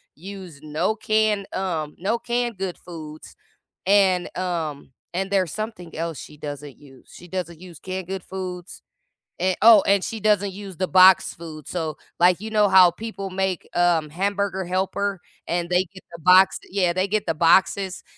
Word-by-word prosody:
use 185 -2 -10
no 155 +7 -1
canned, 215 -3 +1
um, 165 -6 -3
no 215 +6 -1
canned 240 -2 -2
good 190 -2 -4
foods 155 -3 -10 0.5
and, 190 -2 +3
um, 160 -7 -4 0.2
and 190 +1 -2
there's 185 -6 +1
something 215 -7 -6
else 165 -2 -4
she 150 - -10
doesn't 145 -1 -8
use. 135 -3 -18
She 175 - -13
doesn't 175 -3 -5
use 175 -5 -12
canned 185 -1 -5
good 190 -1 -4
foods, 180 -1 -7 0.6
and, 185 +1 +1
oh, 220 -3 +9
and 200 -1 +3
she 225 - -4
doesn't 205 -2 +1
use 195 -3 -9
the 185 - -1
boxed 185 0 +6
food, 155 -3 -10
so, 160 -4 -3 0.2
like, 180 +1 +4
you 220 +2 -7
know, 210 -2 +3
how 185 -2 +7
people 200 0 -6
make, 190 -1 -2
um, 175 -3 +2
hamburger 195 +1 -1
helper, 190 +2 -1 0.3
and 170 0 -2
they 180 +1 +3
get 185 - -13
the 170 - -11
box 185 +2 +5
yeah, 185 -3 +1
they 185 +2 0
get 210 +1 -1
the 165 - 0
boxes, 185 +3 +2
185 Hz, 170 wpm, -23 LUFS, 170-195 Hz, 0.6 s, oh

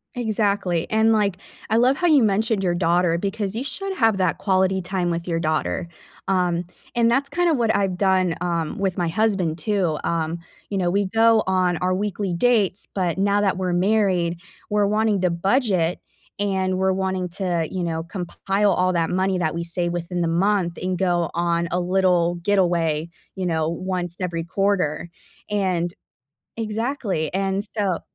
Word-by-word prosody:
Exactly. 200 -7 0
And, 220 +1 +3
like, 200 -4 +1 0.3
I 220 - +3
love 255 +3 +4
how 355 - +1
you 295 -7 +5
mentioned 215 0 +1
your 175 -2 +1
daughter 175 -1 +2
because 200 +2 -3
you 245 - -2
should 385 +8 -4
have 225 -4 +3
that 185 -3 0
quality 190 -1 +2
time 180 -1 -1
with 170 +1 -3
your 165 -1 0
daughter, 155 +2 -1 0.4
um, 180 -2 +1 0.3
and 235 -1 +3
that's 270 +4 +2
kind 350 0 +1
of 310 - +2
what 230 -2 +2
I've 195 -3 0
done, 185 -3 +2
um, 170 -3 -2
with 190 -2 -1
my 175 - +1
husband, 185 -3 0
too. 185 -4 0
Um, 165 0 -1 0.3
you 200 - -2
know, 180 -2 +1
we 200 +1 +1
go 225 +2 +4
on 185 -2 +2
our 185 +2 0
weekly 200 -1 -2
dates, 205 0 +1
but 180 -3 -1
now 200 +1 +2
that 195 -2 +1
we're 185 -2 -1
married, 180 -3 +1 0.3
we're 210 -1 +2
wanting 210 -1 +1
to 180 - +2
budget 185 -2 +1 0.4
and 190 -2 0
we're 190 0 +2
wanting 190 -1 -2
to, 175 -3 -1
you 185 -1 -2
know, 160 -1 -2
compile 195 +3 -1
all 185 0 +2
that 165 -1 +1
money 185 0 0
that 160 -1 -1
we 170 - -2
save 175 0 -2
within 175 +1 -3
the 170 - +1
month 175 +1 +1
and 185 0 -1
go 175 -3 +1
on 170 0 0
a 180 - +1
little 180 -1 +2
getaway, 170 -4 +1 0.3
you 190 - -3
know, 160 -2 0
once 175 0 -3
every 170 -3 -2
quarter, 180 -3 0 0.4
and 185 -4 0 0.7
Exactly. 220 - -2
And 195 +1 -1
so 195 -5 0
185 Hz, 175 wpm, -22 LUFS, 175-205 Hz, 0.7 s, you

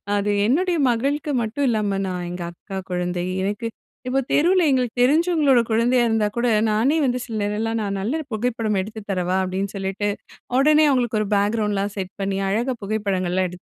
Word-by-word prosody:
அது 205 0 0 0.2
என்னுடைய 345 +8 +2
மகளுக்கு 280 +6 0
மட்டும் 230 +6 -1
இல்லாம 205 -3 0
நான் 180 -1 -3
எங்க 175 0 -5
அக்கா 190 +3 -7
குழந்தை, 180 0 -2 0.2
எனக்கு 205 +4 -2 0.4
இப்போ 265 +2 +1
தெருவில 355 +3 +4
எங்களுக்கு 250 -2 0
தெரிஞ்சவங்களோட 300 -3 +4
குழந்தையா 240 +2 +3
இருந்தா 220 -1 +2
கூட, 235 - +1 0.3
நானே 250 +9 +2
வந்து 250 0 0
சில 225 -3 -5
நேரலாம், 220 +2 -1
நான் 200 -1 -2
நல்ல 225 +7 -1
ஒரு 310 - -6
புகைப்படம் 225 -2 -1
எடுத்து 215 +3 -7
தரவா? 185 0 0
அப்டின்னு 190 +1 -3
சொல்லிட்டு, 195 +1 -2 0.5
உடனே 305 +2 +5
அவுங்களுக்கு 240 -5 +1
ஒரு 210 - -2
பேக்கிரவுண்ட்லாம் 205 -1 0
செட் 190 -1 -4
பண்ணி 195 0 -1
அழகா 240 +6 0
புகைப்படங்கள்லாம் 190 -3 0
எடுத் 180 0 -13
215 Hz, 165 wpm, -22 LUFS, 195-250 Hz, 0.5 s, உடனே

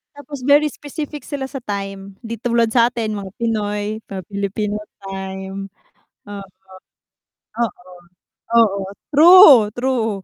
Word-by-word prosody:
tapos 285 -1 -9
very 290 +3 +4
specific 295 +1 -8
sila 275 -3 -5
sa 270 0 -7
time, 195 -1 -6
di 230 +1 -5
tulad 235 -1 +2
sa'tin 235 -3 +1
mga 195 -2 -7
Pinoy, 210 -3 -2 0.3
mga 195 -1 -5
Pilipino 200 +1 -3 0.2
time. 190 0 -7 0.8
Oo, 200 -1 -8 1.1
oo, 185 -5 -4 0.6
oo. 210 -4 +4 0.3
True! 300 - +8
True. 240 -5 -1
220 Hz, 110 wpm, -19 LUFS, 200-265 Hz, 1.1 s, True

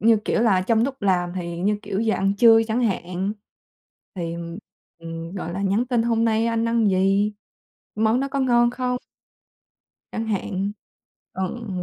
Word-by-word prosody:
Như 225 +1 +5
kiểu - - +1
là, 200 -6 +3
trong 225 +3 +2
lúc 270 -3 -5
làm 180 -3 +1
thì 170 -2 -4
như, 205 +4 +1
kiểu, 200 -1 -2
giờ 225 -1 +1
ăn 195 +1 +1
trưa 225 +1 +7
chẳng 225 +2 0
hạn. 190 -2 -1 0.8
Thì, 170 -3 -4 0.6
ừm, 165 0 -7
gọi 175 -3 -4
là, 195 +3 -3
nhắn 200 +5 +1
tin: 240 -2 +1
"Hôm 230 -1 +1
nay 225 0 +2
anh 230 0 0
ăn 230 -2 +2
gì? 195 +2 +2 0.6
Món 220 +3 +2
đó 275 - -1
có 275 0 -2
ngon 240 -2 +4
không?" 250 0 -2 1.1
Chẳng 225 0 -3
hạn. 200 -1 -2 0.6
Ừ. 190 +5 -4
215 Hz, 165 wpm, -23 LUFS, 190-230 Hz, 1.1 s, trưa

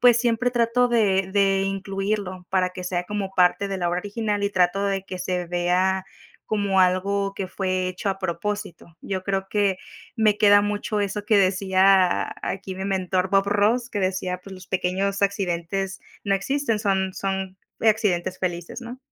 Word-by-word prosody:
pues 245 -2 +6
siempre 240 +1 +1
trato 240 +1 +2
de 195 -5 +2
de 195 -1 +3
incluirlo 195 -1 -3
para 185 -1 +2
que 180 0 -8
sea 180 -1 -2
como 200 0 -4
parte 185 +2 +3
de 195 - -2
la 175 -1 0
obra 175 +1 -1
original, 205 +1 -2
y - - +2
trato 185 +1 +2
de 195 -1 -1
que 185 -1 -7
se 180 0 -2
vea 180 +2 +1 0.4
como 200 -3 +1
algo 195 +2 +1
que 195 - -3
fue 185 -1 -1
hecho 185 +3 -4
a 195 0 -1
propósito. 185 -1 -4
Yo 190 -1 -3
creo 195 -1 -1
que 200 -2 +2 0.4
me 215 -2 +3
queda 205 -1 +6
mucho 205 +1 -1
eso, 205 +1 -2
que 215 - +4
decía 190 -1 +3
aquí 195 0 -4
mi 190 - -4
mentor 190 -1 0
Bob 195 0 +3
Ross, 220 +4 +2
que 205 - -3
decía: 185 -1 -1
"Pues, 195 0 -10
los 185 -1 -12
pequeños 190 +2 -1
accidentes 195 -1 -1 0.2
no 200 -1 +2
existen 230 +3 0
son 190 -2 0
son 190 -1 -3 0.2
accidentes 205 -5 +1
felices 175 +3 -4
¿no?" 245 +1 -8
195 Hz, 175 wpm, -24 LUFS, 185-205 Hz, 0.4 s, pues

